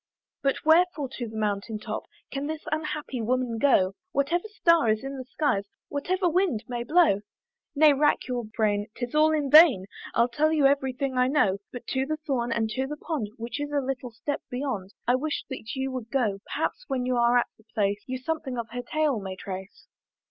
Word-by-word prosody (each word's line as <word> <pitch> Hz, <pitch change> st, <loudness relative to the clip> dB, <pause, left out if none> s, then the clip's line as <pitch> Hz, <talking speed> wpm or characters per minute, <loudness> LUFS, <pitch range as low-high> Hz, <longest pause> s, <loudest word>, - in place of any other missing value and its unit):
"But 275 Hz, +1 st, 0 dB
wherefore 320 Hz, -3 st, +4 dB
to 240 Hz, -, -3 dB
the 220 Hz, -, -8 dB
mountain 210 Hz, +1 st, -1 dB
top 210 Hz, -, -5 dB, 0.3 s
"Can 275 Hz, +1 st, -3 dB
this 310 Hz, 0 st, -4 dB
unhappy 305 Hz, -5 st, -3 dB
woman 245 Hz, 0 st, 0 dB
go, 195 Hz, -9 st, +4 dB, 0.2 s
"Whatever 315 Hz, +7 st, +1 dB
star 335 Hz, -, +3 dB
is 215 Hz, +3 st, +1 dB
in 270 Hz, +1 st, -5 dB
the 260 Hz, -1 st, -6 dB
skies, 250 Hz, -7 st, 0 dB, 0.2 s
"Whatever 360 Hz, +6 st, 0 dB
wind 340 Hz, -, +1 dB
may 240 Hz, -1 st, -3 dB
blow?" 305 Hz, -, +4 dB, 0.5 s
Nay 300 Hz, 0 st, +7 dB
rack 295 Hz, +2 st, +2 dB
your 250 Hz, -2 st, -2 dB
brain 210 Hz, -1 st, 0 dB
'tis 245 Hz, -1 st, -4 dB
all 310 Hz, +1 st, +5 dB
in 295 Hz, -3 st, 0 dB
vain, 300 Hz, -, +8 dB, 0.3 s
I'll 235 Hz, +1 st, +4 dB
tell 295 Hz, +6 st, +1 dB
you 305 Hz, -3 st, +3 dB
every 275 Hz, -1 st, +3 dB
thing 260 Hz, 0 st, -2 dB
I 250 Hz, -, +4 dB
know; 230 Hz, -9 st, +2 dB
But 245 Hz, -1 st, -8 dB
to 265 Hz, 0 st, 0 dB
the 310 Hz, +1 st, -1 dB
thorn, 260 Hz, -6 st, -2 dB
and 230 Hz, -1 st, +1 dB
to 265 Hz, +4 st, -1 dB
the 300 Hz, +2 st, -5 dB
pond 295 Hz, -, -3 dB
Which 235 Hz, +5 st, -5 dB
is 290 Hz, 0 st, -3 dB
a 290 Hz, -, +2 dB
little 260 Hz, -2 st, -3 dB
step 260 Hz, +5 st, -4 dB
beyond, 245 Hz, -7 st, -4 dB
I 245 Hz, -, +5 dB
wish 290 Hz, +4 st, -1 dB
that 245 Hz, -2 st, -6 dB
you 265 Hz, 0 st, -2 dB
would 250 Hz, -3 st, -5 dB
go: 225 Hz, -7 st, 0 dB
Perhaps -, -, -2 dB
when 255 Hz, -2 st, -1 dB
you 250 Hz, 0 st, +1 dB
are 240 Hz, +1 st, +4 dB
at 240 Hz, -, +1 dB
the -, -, -21 dB
place 205 Hz, -1 st, +1 dB
You 255 Hz, 0 st, -2 dB
something 265 Hz, -1 st, -3 dB
of 230 Hz, -1 st, -4 dB
her 245 Hz, +1 st, -3 dB
tale 295 Hz, -1 st, 0 dB
may 190 Hz, -1 st, -5 dB
trace. 190 Hz, +1 st, -8 dB
260 Hz, 205 wpm, -27 LUFS, 230-295 Hz, 0.5 s, vain